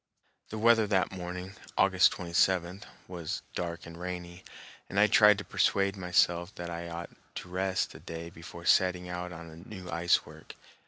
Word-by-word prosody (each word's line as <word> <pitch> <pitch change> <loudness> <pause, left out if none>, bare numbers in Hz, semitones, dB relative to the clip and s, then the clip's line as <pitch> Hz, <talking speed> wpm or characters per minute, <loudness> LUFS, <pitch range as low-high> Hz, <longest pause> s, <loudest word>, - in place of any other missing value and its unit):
The 110 - -5
weather 115 -1 +4
that 95 -3 +1
morning, 90 +1 -6 0.2
August 95 -3 +5
27, 90 +1 +1 0.3
was 85 -3 -5
dark 85 0 -4
and 85 - -10
rainy, 90 0 -6 0.5
and 100 - 0
I 105 - +7
tried 105 0 +6
to - - -5
persuade 100 0 +1
myself 90 0 +1
that 85 0 -6
I 85 0 -5
ought 85 +1 -6 0.2
to 90 - -7
rest 95 +1 -1
a - - -11
day 85 +1 -7
before 85 0 -11
setting 90 0 +3
out 90 0 -4
on 80 -1 -10
new 95 -4 -8
ice 85 +1 +2
work. - - -13
90 Hz, 165 wpm, -30 LUFS, 85-95 Hz, 0.5 s, I